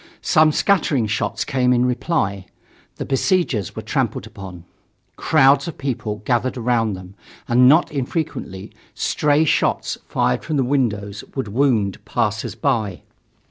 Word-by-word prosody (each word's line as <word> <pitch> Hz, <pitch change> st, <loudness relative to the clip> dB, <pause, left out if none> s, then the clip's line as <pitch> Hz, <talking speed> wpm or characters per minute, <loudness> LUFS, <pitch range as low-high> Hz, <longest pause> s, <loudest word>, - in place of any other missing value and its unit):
Some 155 Hz, 0 st, +4 dB
scattering 150 Hz, -, +2 dB
shots 105 Hz, 0 st, -2 dB
came 130 Hz, -3 st, +1 dB
in 125 Hz, 0 st, +3 dB
reply. 120 Hz, -, -1 dB, 0.5 s
The -, -, -5 dB
besiegers 135 Hz, -, 0 dB
were -, -, -6 dB
trampled -, -, -2 dB
upon. 95 Hz, -3 st, -10 dB, 0.5 s
Crowds 140 Hz, -1 st, +3 dB
of 170 Hz, -, -6 dB
people 110 Hz, -6 st, -4 dB
gathered 125 Hz, +1 st, 0 dB
around 115 Hz, -3 st, +1 dB
them, 95 Hz, 0 st, -11 dB, 0.3 s
and 125 Hz, +2 st, +5 dB
not 160 Hz, +5 st, +4 dB
infrequently 135 Hz, -, -4 dB, 0.2 s
stray 150 Hz, +1 st, +1 dB
shots -, -, 0 dB
fired 65 Hz, 0 st, 0 dB
from 155 Hz, -2 st, -2 dB
the 135 Hz, -, +2 dB
windows 105 Hz, -7 st, -1 dB
would 130 Hz, -6 st, -3 dB
wound 110 Hz, -5 st, +1 dB
passers 110 Hz, -2 st, -2 dB
by. 110 Hz, -9 st, -1 dB
125 Hz, 135 wpm, -20 LUFS, 105-140 Hz, 0.5 s, and